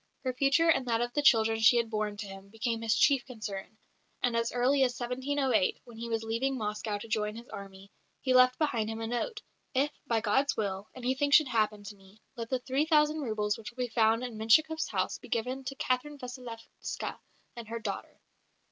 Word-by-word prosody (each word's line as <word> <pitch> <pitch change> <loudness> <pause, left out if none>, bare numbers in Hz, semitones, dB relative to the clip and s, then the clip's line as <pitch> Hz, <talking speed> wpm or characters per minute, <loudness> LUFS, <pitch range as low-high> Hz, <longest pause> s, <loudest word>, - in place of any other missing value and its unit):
Her 255 -1 -1
future 280 +6 +3
and 270 -6 +3
that 230 -1 +2
of 240 0 -2
the 295 - +1
children 225 -5 +4
she 225 +2 +6
had 230 -1 0
borne 210 -1 -2
to 210 - -5
him 195 0 -11
became 225 +1 -2
his 225 -2 +1
chief 275 -4 +4
concern; 215 -4 -7 0.5
and 245 -2 +2
as 230 0 +1
early 255 +3 +2
as 250 -2 +1
1708, 255 -3 0
when 240 -2 -14
he 235 0 -5
was 225 -1 -1
leaving 245 +4 -1
Moscow 210 -1 -2
to 205 - -9
join 210 -1 -1
his 235 +2 -10
army, 195 0 -10 0.3
he 260 - +1
left 255 0 +6
behind 235 -8 0
him 225 0 -4
a 225 - -3
note: 420 - -3 0.3
"If, 280 +3 +2 0.2
by 230 -1 +2
God's 250 +6 +1
will, 200 -1 -2
anything 260 +3 0
should 285 -1 +6
happen 215 -3 0
to 205 +1 -8
me, 195 +2 -20 0.2
let 230 -2 -5
the 260 - +1
3000 300 +4 +2
roubles 215 -5 -1
which 220 - -7
will 250 +1 -4
be - - -8
found 225 +1 +3
in 235 -3 -6
Menshikoff's 310 +9 +3
house - - -1
be - - -13
given 250 +3 -2
to 275 - -4
Catherine 270 +3 -1
Vassilevska 245 -3 -7 0.4
and 235 -2 -8
her 230 +1 -4
daughter." 230 - -6
235 Hz, 205 wpm, -30 LUFS, 220-260 Hz, 0.5 s, she